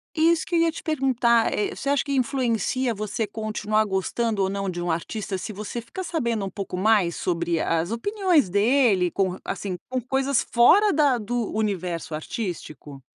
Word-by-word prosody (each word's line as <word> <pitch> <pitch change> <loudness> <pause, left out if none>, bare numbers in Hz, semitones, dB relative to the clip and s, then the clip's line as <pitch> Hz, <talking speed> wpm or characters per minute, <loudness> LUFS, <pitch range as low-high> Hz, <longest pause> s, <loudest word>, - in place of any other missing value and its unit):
Isso 330 +1 +3
que 345 - -1
eu - - +4
ia 330 - +3
te - - -8
perguntar, 250 -6 +2
é 210 - -1
você 275 - -6
acha 285 0 +2
que 280 - -5
influencia 255 -1 0
você 215 +1 -3
continuar 215 0 -1
gostando 205 +2 -1
ou 190 - +1
não 195 0 -3
de 175 -2 -3
um 175 - -2
artista. 190 +4 -3
Se 215 - -6
você 210 +4 -5
fica 235 +11 -7
sabendo 235 - -1
um 195 - -4
pouco 195 -1 -6
mais 190 -3 +2
sobre 170 -1 -1
as 165 +4 0
opiniões 350 - +1
dele, 205 -3 +3
com, 190 -2 0
assim, 190 -1 -4
com 255 0 -2
coisas 265 +1 +1
fora 385 - +6
da 290 -5 +3
do 235 +1 -3
universo 180 -6 -2
artístico. 155 - -6
220 Hz, 180 wpm, -24 LUFS, 190-260 Hz, -, fora